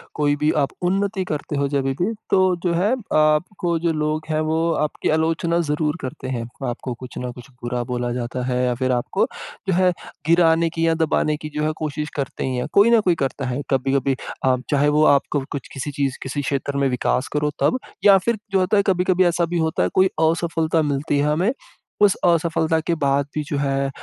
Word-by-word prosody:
कोई 145 -1 +2
भी 150 +1 +1
आप 140 - +1
उन्नति 195 +2 0
करते 150 0 -3
हो 140 0 +1
जभी 135 -1 0
भी, 205 +6 +1 0.2
तो 185 -1 +3
जो 175 -2 +1
है 185 +6 +2
अ, 240 -4 -4
आपको 165 +3 +2
जो 170 0 +1
लोग 155 0 -1
हैं 155 0 0
वो 160 - +1 0.3
आपकी 150 - -3
आलोचना 165 +2 +1
ज़रूर 150 +1 0
करते 130 0 -6
हैं। 120 -3 -2 0.3
आपको 120 +1 -4
कुछ 125 +1 -10
न 125 0 -4
कुछ 120 +1 -13
बुरा 120 0 -2
बोला 120 0 -1
जाता 125 +1 -3
है 125 0 0
या 125 -1 +1
फिर 130 +1 0
आपको 120 -1 0
अ, - - +1 0.4
जो 190 - +2
है 185 +1 +4 0.4
गिराने 165 0 +4
की 165 0 -1
या 165 - +3
दबाने 155 -1 +1
की 150 0 -7
जो 150 - -1
है 155 - +1
कोशिश 150 0 -3
करते 140 -2 -3
ही 130 - -2
हैं। 125 - -2
कोई 205 +3 +6
न 235 - +6
कोई 180 -4 +2
करता 135 0 -2
है। 125 +3 -2
कभी-कभी 135 0 +1 0.3
आप 130 -1 +2
चाहे 145 0 +3
वो 150 +1 +3
आपको 140 0 +2
कुछ 140 - -5
किसी 140 +1 -4
चीज़, 140 -2 -1
किसी 135 +2 -3
क्षेत्र 140 0 -2
में 140 0 +2
विकास 125 +1 0
करो 150 0 +1
तब 255 - +3 0.3
या 200 -1 +8
फिर 225 +4 0
जो 195 - +3
होता 185 +3 +2
है 200 - +4
कभी-कभी 185 -1 +3
ऐसा 175 0 +2
भी 175 +1 -2
होता 160 - +1
है 90 - +1
कोई 190 - +5
असफलता 165 0 +1
मिलती 145 0 0
है 145 - +2
हमें 180 +9 +1 0.5
उस 205 -2 +5
असफलता 165 -1 +2
के 170 - +2
बाद 140 0 +2
भी 150 - -1
जो 145 0 -3
है 135 -1 0
150 Hz, 220 wpm, -22 LUFS, 135-170 Hz, 0.5 s, या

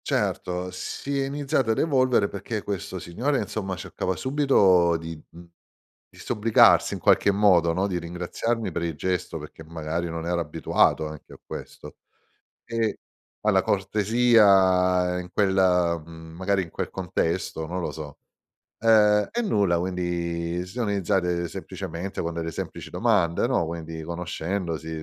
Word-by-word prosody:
Certo, 90 0 -1
si 140 +9 -4
è - - 0
iniziato 135 -3 -1
ad 110 - +2
evolvere, 130 -8 +3
perché 100 +2 -5
questo 95 -2 -4
signore, 120 +12 -1
insomma, 100 -3 -3
cercava 90 +1 -3
subito 95 - +3
di, 80 0 -7
mhmm, 85 +1 -14 0.6
disobbligarsi 110 +1 +3
in - - -4
qualche 100 - +4
modo, 95 -5 +4
no, 95 +4 0
di 90 -3 -2
ringraziarmi 90 +6 -3
per 85 - -3
il 85 -1 -2
gesto 90 +4 -2
perché 80 - -11
magari 80 +1 -4
non 80 0 -5
era 85 0 0
abituato 80 0 +1
anche 75 -1 -11
a - - -14
questo. - - -9 0.7
E 115 -2 -1 0.4
alla - - +3
cortesia 95 -4 +3
in 90 0 -8
quel 100 -2 +2 0.5
mhmm, 80 0 -12
magari 95 +2 0
in 85 - -11
quel - - -4
contesto, 85 -2 -2
non 90 +3 -3
lo 85 - -3
so. 75 -2 -8 0.6
Ehm, 105 -2 +5
e 240 - -2
nulla, 100 - +2
quindi 85 -1 -2
sì, 90 - -11
sono 120 -3 -2
iniziate 90 -3 0
semplicemente 90 +2 -6
con 85 0 -3
delle 80 0 -3
semplici - - -6
domande, 100 -6 +2
no, 125 -8 +1
quindi 80 0 -6
conoscendosi 85 0 -4
90 Hz, 145 wpm, -25 LUFS, 85-105 Hz, 0.7 s, Ehm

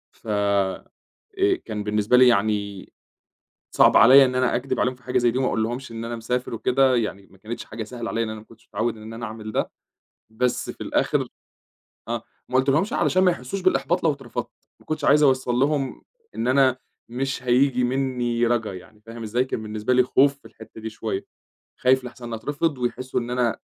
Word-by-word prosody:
ف - - -18
آآ 100 -2 0 0.8
كان 105 -1 -4
بالنسبة 105 +3 +2
لي 130 - +7
يعني 100 -3 0 0.8
صعب - - +6
عليّا 135 +4 +8
إن 125 0 -2
أنا 130 -1 +2
أكدِب 130 +3 -2
عليهم 125 +1 +1
في 125 - -25
حاجة 125 - -1
زَي 120 -1 +3
دي 125 - -3
وما 130 - +1
أقولش 120 +3 -2
ليهم 115 - -7
إن 115 - -5
أنا 120 - -4
مسافر 125 +2 -3
وكده 130 +3 +2
يعني، 100 -4 -2
ما 95 - -19
كانتش 110 +5 -7
حاجة 110 +1 -6
سهلة 115 +1 -6
عليّا 115 - -1
لإن 110 - -5
أنا 110 - -6
ما 105 - -16
كنتش 115 0 -20
متعوّد 115 -1 -2
إن 110 +1 -9
أنا 115 +1 -5
أعمل 110 0 -7
ده - - -1 0.6
بس 125 +3 -1
في - - -13
الآخِر، - - 0 0.8
آه، 115 0 -3 0.3
ما 130 - -4
قُلتش 130 +1 +3
ليهم 155 +8 +3 0.2
علشان 185 +1 +3
ما 180 - +5
يحسّوش 170 +5 -5
بالإحباط 175 -2 +1
لو 160 - +4
اترفضت، 135 -4 -6 0.3
ما - - -22
كنتش 155 - -3
عايز 150 +1 +5
أوصّل 130 -3 +2
لهم 135 0 0 0.3
إن 120 - -2
أنا 130 -1 +4 0.3
مش 130 +2 -3
هييجي 125 0 +3
منّي 125 -2 0
رجا 115 -4 0
يعني، 105 +4 -13
فاهم 115 0 -8
إزاي؟ 120 +4 0
كان 110 - -4
بالنسبة 110 +3 -1
لي 125 0 +5
خوف 140 +2 +3
في - - -30
الحِتّة 110 0 -13
دي 110 - -4
شوية، 110 -2 -4 0.6
خايف 130 0 +3
لأحسَن 120 -1 -8
أترفض 145 +5 -2
ويحسّوا 125 +1 -2
إن 120 0 -6
أنا 125 -3 0
120 Hz, 200 wpm, -23 LUFS, 110-130 Hz, 0.8 s, عليّا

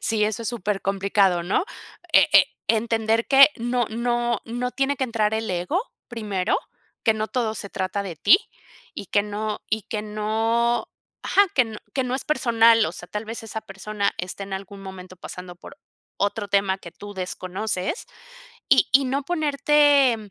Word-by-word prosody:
Sí, 215 -1 +1
eso 215 +1 -2
es 225 - -3
supercomplicado, 195 -3 +1
¿no?, 185 - 0 0.5
e - - +6
e - - +7 0.2
entender 225 0 +1
que 275 +1 +8
no 240 0 0
no 240 0 0
no 245 +2 -3
tiene 275 +1 0
que 260 - 0
entrar 220 -3 0
el 220 -1 -2
ego 180 - -1 0.3
primero, 210 -6 -1 0.5
que 225 - +3
no 215 0 -3
todo 230 -4 -1
se 200 -2 -7
trata 190 +1 -2
de 185 -5 -7
ti 335 - +6 0.6
y 200 - -7
que 205 - +2
no 210 +1 -4
y 220 -1 0
que 210 +1 -4
no 225 +3 0 0.4
ajá - - +3
que 250 - +5
no 220 -2 -8 0.2
que 265 - 0
no 250 0 -2
es 265 - -2
personal, 230 -6 +4
o - - -4
sea, - - -10
tal 210 +1 -4
vez 225 +1 -6
esa 220 0 -5
persona 200 0 -3
esté 185 +2 -5
en 195 - -10
algún 195 +1 -7
momento 185 -1 -10
pasando 180 0 -9
por - - -13 0.4
otro 205 0 -1
tema 195 -1 +1
que 170 -3 -11
tú 205 0 -10
desconoces 185 - -3 0.6
y - - +5
y 275 +1 +5
no 270 +2 -1
ponerte, 290 -4 +3
220 Hz, 175 wpm, -23 LUFS, 200-240 Hz, 0.6 s, que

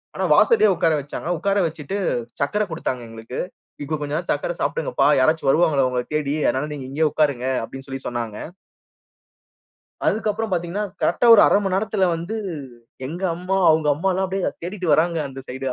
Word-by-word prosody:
ஆனா - - -1
வாசலே 455 - +5
உட்கார 165 -1 +2
வச்சாங்க. 145 +4 -6
உட்கார 200 +3 0
வச்சுட்டு 160 +4 -5 0.4
சர்க்கரை 210 +10 +1
கொடுத்தாங்க 130 -6 -3
எங்களுக்கு. 115 +2 -7 0.4
இப்போ 155 +2 -2
கொஞ்சம் 145 +1 -2
நே 175 - -8
சர்க்கரை - - -1
சாப்பிடுங்க. - - -1 0.3
யாராச்சும் 155 +2 +2
வருவாங்களா 150 -5 +3
உங்களைத் 125 +1 -3
தேடி, 150 -1 0
அதனால 145 +3 0
நீங்க 135 -3 -7
இங்கயே 155 +2 +2
உட்காருங்க 140 -5 +1 0.2
அப்படின்னு 135 +4 -9
சொல்லி 135 0 -5
சொன்னாங்க. 115 -3 -4 1.7
அதுக்கு 215 0 +1
அப்புறம் 220 +1 -3
பார்த்தீங்கன்னா, 175 +4 -1 0.2
கரெக்ட்டா - - +2
ஒரு 215 - +7
1/2 - - +4
மணி 190 -1 0
நேரத்தில 200 -1 +1
வந்து 170 +6 -5 0.7
எங்க 170 +6 -6
அம்மா, 185 +2 -2
அவங்க 155 -1 +2
அம்மா 170 +7 -1
எல்லாம் 190 +1 0
அப்படியே 190 0 -1
தேடிட்டு 180 -2 -1
வர்றாங்க. 165 +2 +2
அந்த 135 0 -9
சைடா. 130 +1 -3
160 Hz, 170 wpm, -22 LUFS, 135-190 Hz, 1.7 s, ஒரு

